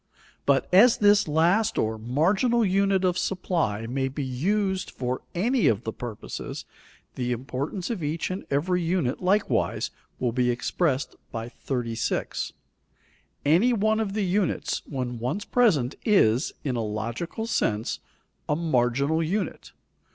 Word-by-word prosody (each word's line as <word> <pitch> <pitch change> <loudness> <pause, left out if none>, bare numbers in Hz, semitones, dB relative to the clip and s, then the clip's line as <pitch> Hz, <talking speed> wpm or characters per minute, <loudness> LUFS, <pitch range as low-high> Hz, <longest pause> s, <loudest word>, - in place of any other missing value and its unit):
But 140 -1 +3
as 220 +6 +7
this 205 -2 +5
last 170 +8 +2
or 110 0 0
marginal 190 - +2
unit 195 0 +2
of 180 0 +1
supply 165 - -1
may 135 +3 -1
be 140 +2 -4
used 190 +9 0
for 125 0 -3
any 235 +7 +2
of 105 - +2
the 110 - -4
purposes, 120 -4 -6 0.5
the 125 -1 -2
importance 135 - -3
of 215 -7 -3
each 155 +4 -2
and 185 - -4
every 180 +6 +1
unit 165 -6 0
likewise 195 +3 +1 0.3
will 125 -2 0
be 125 +1 +1
expressed 135 +3 0 0.2
by 115 +1 -5
36. 120 -3 -2 0.9
Any 180 +12 +4
one 215 0 +2
of 210 -3 -1
the 210 -1 0
units, 185 0 0
when 125 -4 -4
once 130 - -2
present 165 - +3
is, 130 - +3
in 130 -4 -1
a 115 - -1
logical 115 - -3
sense, 110 - 0 0.5
a 150 - +3
marginal 140 0 +1
unit. 190 +6 -2
160 Hz, 135 wpm, -26 LUFS, 125-195 Hz, 0.9 s, as